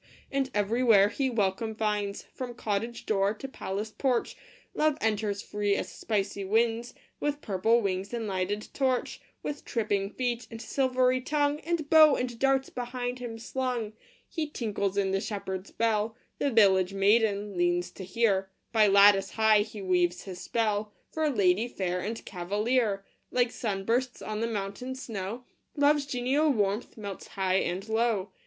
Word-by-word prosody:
And 275 -1 0
everywhere 210 -1 +4
he 265 +3 -1
welcome 220 -1 -1
finds, 210 -2 -1
From 250 -2 -7
cottage 225 +2 -3
door 200 0 +1
to 270 - -7
palace 210 -4 -4
porch 255 -4 0 0.4
Love 305 -1 +2
enters 210 -2 -1
free 205 -1 0
as - - -3
spicy 200 -2 -2
winds, 225 +4 +1 0.2
With 290 0 -1
purple 220 +4 +2
wings 190 0 -2
and 235 -2 -3
lighted 200 +1 -2
torch, 260 -2 0 0.2
With 295 0 -4
tripping 205 -4 -1
feet 245 0 -2
and 225 - -8
silvery 255 +1 +1
tongue, 290 +2 +1
And 330 -2 -2
bow 310 -2 +7
and 245 -2 -3
darts 270 0 +2
behind 245 0 -4
him 235 -2 -6
slung. 240 -2 -3 0.3
He 315 -4 -3
tinkles 205 -7 -2
in 195 -1 +1
the 195 0 0
shepherd 190 -3 -4
s - - -15
bell 220 -1 0 0.2
The 285 - +1
village 195 -5 +4
maiden 205 0 +2
leans 175 0 +1
to 190 - -9
hear 190 -1 +1 0.2
By 220 -2 +5
lattice 200 -1 +6
high 220 -1 +5
he 210 -1 -6
weaves 180 -1 +1
his 185 -2 -8
spell, 215 -2 -1 0.2
For 315 -1 0
lady 200 -3 +2
fair 180 -6 -2
and 220 +5 -5
cavalier: 205 +3 0 0.2
Like 245 -1 +1
sun 195 -4 -3
bursts 245 +3 0
on 215 0 -3
the 230 - +1
mountain 215 +4 -4
snow, 225 -1 -5 0.3
Love 290 +1 +4
s 280 -1 -4
genial 270 +4 +1
warmth 210 -3 0
melts 200 -3 -7
high 190 -1 0
and 190 +2 -2
low. 220 -3 0
220 Hz, 160 wpm, -28 LUFS, 200-250 Hz, 0.4 s, bow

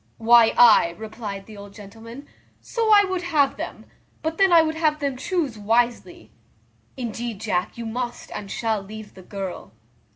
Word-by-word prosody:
"Why, 230 0 +5
ay," 215 -8 +6
replied 215 -3 -7
the 215 - -12
old 200 0 -12
gentleman, 225 +6 -12 0.3
"so 455 -2 -1
I 410 -1 +7
would 375 -2 -3
have 305 -6 +1
them; - - -7 0.4
but 320 +2 -3
then 390 -1 +4
I 335 -1 +7
would 315 0 -1
have 310 -1 +1
them 280 -3 -2
chuse 275 - -3
wisely. 235 +3 -1 0.7
Indeed, 235 -3 -5
Jack, 195 -3 -2
you 235 - -6
must 240 +2 -5
and 200 -1 -7
shall 220 -2 -2
leave 215 +2 -10
the 190 - -13
girl." 190 - -7
230 Hz, 165 wpm, -23 LUFS, 210-300 Hz, 0.7 s, I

